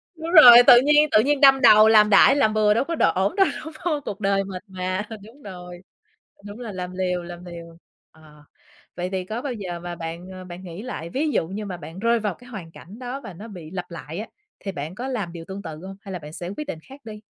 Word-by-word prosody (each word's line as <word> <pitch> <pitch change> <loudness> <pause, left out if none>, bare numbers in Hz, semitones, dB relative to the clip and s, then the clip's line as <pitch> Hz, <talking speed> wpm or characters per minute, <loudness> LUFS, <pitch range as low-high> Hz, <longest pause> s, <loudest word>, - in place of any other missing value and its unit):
Đúng 325 +1 -6
rồi, 255 -9 +10
tự 240 - +9
nhiên 295 +2 +4
tự 215 - +5
nhiên 290 0 0
đâm 270 -1 +6
đầu 215 -3 +7
làm 215 -1 +5
đại 215 +7 +6
làm 220 -7 +2
bừa 215 -1 +3
đâu 230 - +1
có 335 +4 -4
đ - - -5
ổn 190 +2 0
đâu, 390 - +4 0.2
đúng 315 - -8
hông? 330 -5 -2
Cuộc 200 - -6
đời 195 -1 0
mình 190 -2 -8
mà 185 +1 -4 0.2
đúng 235 +7 -16
rồi. 180 -4 -10 0.6
Đúng 205 +3 -10
là 235 -3 -7
làm 180 -2 -6
liều 180 -1 -2
làm 175 +1 -10
liều. 170 -1 -11 0.3
Ờ, 150 -2 -19 0.5
vậy 180 +1 -4
thì 190 -1 -4
có 220 +5 -5
bao 270 -2 -4
giờ 185 -6 -6
mà 175 0 -7
bạn, 170 +2 -8
à, 185 0 -9
bạn 180 0 -10
nghĩ 175 +1 -9
lại, 215 -9 -7
ví 300 - -1
dụ 165 - 0
như 210 +3 -6
mà 185 -3 -6
bạn 165 +3 -10
rơi 235 +1 +1
vào 210 -3 -2
cái 245 +6 -17
hoàn 185 -8 -9
cảnh 200 +8 -14
đó 255 +2 -6
và 195 - -10
nó 205 +7 -11
bị 175 -7 -11
lặp 180 -1 -6
lại 170 0 -8
á, 220 - -6 0.3
thì 195 - -5
bạn 155 +1 -7
có 245 +4 -5
làm 210 -10 -4
điều 165 -1 -9
tương 195 +1 -7
tự 160 -4 -8
hông, 195 - -9
hay 195 - -10
là 180 - -5
bạn 150 -1 -11
sẽ 175 +1 -6
quyết 300 - -3
định 160 - -6
khác 275 +2 -13
đi? 215 -1 -9
195 Hz, 265 wpm, -23 LUFS, 175-235 Hz, 0.6 s, rồi